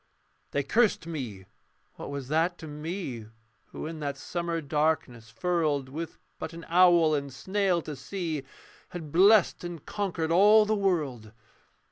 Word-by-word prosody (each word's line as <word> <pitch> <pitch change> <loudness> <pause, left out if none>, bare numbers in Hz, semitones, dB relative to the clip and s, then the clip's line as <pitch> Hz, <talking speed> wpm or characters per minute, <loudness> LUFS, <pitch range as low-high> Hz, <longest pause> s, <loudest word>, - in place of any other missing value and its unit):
They 140 - -1
cursed 215 - +2
me: 125 - -6 0.5
what - - -8
was 140 -2 -5
that 165 +3 +1
to 160 - -9
me 150 - -5 0.4
Who - - -7
in 160 0 -6
that 145 -2 -3
summer 170 -1 -3
darkness 150 -6 -1
furled, 150 -1 0
With 160 +4 -6 0.2
but 160 +1 -5
an 165 0 -9
owl 170 -2 +5
and 140 -2 -2
snail 190 +1 0
to 150 - -6
see, 165 -2 -4 0.5
Had 160 -4 -7
blessed 195 +3 +5
and 175 -4 -7
conquered 175 -6 -2
all 210 +5 +6
the 215 - +1
world? 150 - -1
160 Hz, 145 wpm, -28 LUFS, 145-180 Hz, 0.5 s, all